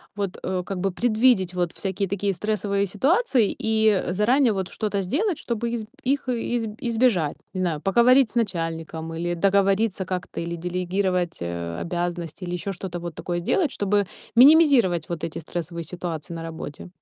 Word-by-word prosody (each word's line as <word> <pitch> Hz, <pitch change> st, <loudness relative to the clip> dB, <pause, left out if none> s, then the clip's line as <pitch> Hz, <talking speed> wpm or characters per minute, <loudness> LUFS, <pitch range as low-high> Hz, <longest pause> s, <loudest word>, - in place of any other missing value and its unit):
вот, 200 Hz, -3 st, -3 dB
э, 185 Hz, -1 st, -1 dB
как 195 Hz, -, -4 dB
бы 195 Hz, 0 st, 0 dB
предвидеть 220 Hz, -5 st, +3 dB
вот 175 Hz, -2 st, -1 dB
всякие 195 Hz, 0 st, -2 dB
такие 200 Hz, 0 st, 0 dB
стрессовые 200 Hz, +1 st, -1 dB
ситуации 265 Hz, -, +2 dB
и, 220 Hz, 0 st, +2 dB
э, 185 Hz, -3 st, 0 dB
заранее 235 Hz, +4 st, +3 dB
вот 190 Hz, -2 st, -3 dB
что-то 205 Hz, -2 st, -2 dB
сделать, 320 Hz, -, 0 dB
чтобы 235 Hz, 0 st, -2 dB
изб 220 Hz, -3 st, -3 dB, 0.2 s
их 270 Hz, 0 st, 0 dB
э 240 Hz, 0 st, -1 dB
изб 225 Hz, -3 st, -1 dB
избежать? 225 Hz, -, +1 dB, 0.2 s
Не 185 Hz, -, -2 dB
знаю, 160 Hz, -4 st, -1 dB
поговорить 240 Hz, +5 st, +5 dB
с -, -, -20 dB
начальником 165 Hz, -6 st, -2 dB
или 175 Hz, +1 st, -2 dB
договориться 195 Hz, +1 st, +2 dB
как-то 180 Hz, -1 st, -4 dB
или 170 Hz, 0 st, -3 dB
делегировать, 180 Hz, 0 st, -1 dB
э, 85 Hz, -1 st, -4 dB
обязанности 175 Hz, 0 st, -3 dB
или 175 Hz, -, -4 dB
ещё 185 Hz, +3 st, -3 dB
что-то 175 Hz, -1 st, -6 dB
вот 170 Hz, -2 st, -6 dB
такое 175 Hz, -1 st, -3 dB
сделать, 305 Hz, -, +1 dB
чтобы 205 Hz, -1 st, +1 dB, 0.3 s
минимизировать 255 Hz, -, +6 dB
вот 165 Hz, -2 st, -4 dB
эти 165 Hz, -, -4 dB
стрессовые 170 Hz, +1 st, -5 dB
ситуации 170 Hz, -2 st, -5 dB
на 165 Hz, -, -5 dB
работе. 160 Hz, 0 st, -7 dB
190 Hz, 170 wpm, -24 LUFS, 175-220 Hz, 0.3 s, минимизировать